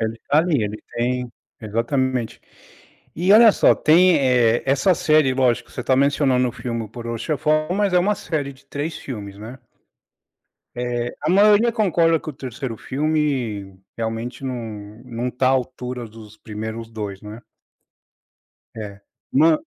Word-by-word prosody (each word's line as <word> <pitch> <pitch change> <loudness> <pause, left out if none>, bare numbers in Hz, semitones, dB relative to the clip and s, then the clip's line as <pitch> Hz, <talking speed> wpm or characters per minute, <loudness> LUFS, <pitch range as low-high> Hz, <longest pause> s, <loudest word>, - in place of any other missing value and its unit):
Ele 110 0 -1
está 140 +5 0
ali, 155 -7 +2
ele 105 +1 -4
tem 125 +1 -1 0.3
exatamente. 115 +2 -1 0.8
E 180 +4 +3
olha 225 +1 +9
só, - - +4
tem, 175 +2 +5
eh, 125 -3 +3
essa 140 +7 +3
série 155 -5 +3
lógico, 125 -3 +1
você - - -6
está 130 +1 +1
mencionando 135 -2 +2
o - - -6
filme 115 -2 -4
O - - -10
Poderoso 115 +1 -6
Chefão 155 0 0
mas 200 -2 +1
é 180 - +5
uma 205 +4 +2
série 145 -7 -3
de 130 - -22
3 145 +3 -4
filmes, 100 -6 -7
né. 115 +5 -9 1.2
Eh, 120 0 -3
a 155 - 0
maioria 210 +4 +5
concorda 170 -7 +2
que - - -9
o - - -3
3º 130 -3 -6
filme 130 -11 -2 0.2
realmente 115 +3 -4
não 110 -3 -6
não 120 0 -4
está 130 +1 -1
à - - +4
altura 125 -2 -3
dos 110 -1 -14
primeiros 110 +1 -7
2, 105 -3 -6
né. 105 +3 -9 1.3
É. 105 -2 -8 0.3
Uma 155 +3 +4
125 Hz, 150 wpm, -21 LUFS, 115-155 Hz, 1.3 s, olha